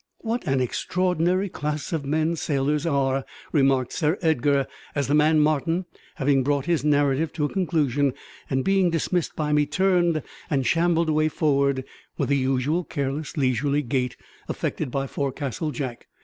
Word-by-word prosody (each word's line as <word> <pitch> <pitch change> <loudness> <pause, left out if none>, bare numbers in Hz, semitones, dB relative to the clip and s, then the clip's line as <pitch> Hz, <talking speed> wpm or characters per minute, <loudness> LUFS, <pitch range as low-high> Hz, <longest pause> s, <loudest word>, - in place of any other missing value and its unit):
"What 230 -2 -3
an 135 -2 +2
extraordinary 180 +7 0
class 150 -2 -4
of 155 -4 -2
men 160 +3 +1
sailors 150 +1 0
are!" 135 -3 +1 0.3
remarked 135 -4 +2
Sir 160 +1 +1
Edgar, 145 -3 +2 0.3
as 140 -1 +1
the 145 - +1
man 155 +1 +4
Martin, 155 +4 +1 0.3
having 135 -1 +2
brought 140 0 0
his 170 -6 +1
narrative 145 +1 +2
to 150 -3 0
a - - -1
conclusion, 145 -7 +1 0.3
and 130 0 0
being 195 -2 +3
dismissed 170 +1 -1
by 150 -1 -1
me, 150 -1 +3
turned 175 -1 +2 0.3
and 135 -3 +1
shambled 170 +1 +2
away 155 0 +3
forward 140 -3 +1 0.3
with - - -1
the 140 - +3
usual 135 +6 +1
careless, 145 +1 -4
leisurely 140 +2 +1
gait 125 0 -1 0.3
affected 150 - -2
by 135 +2 -2
forecastle 140 +2 -3
Jack. 130 -5 -5
150 Hz, 155 wpm, -24 LUFS, 135-165 Hz, 0.3 s, man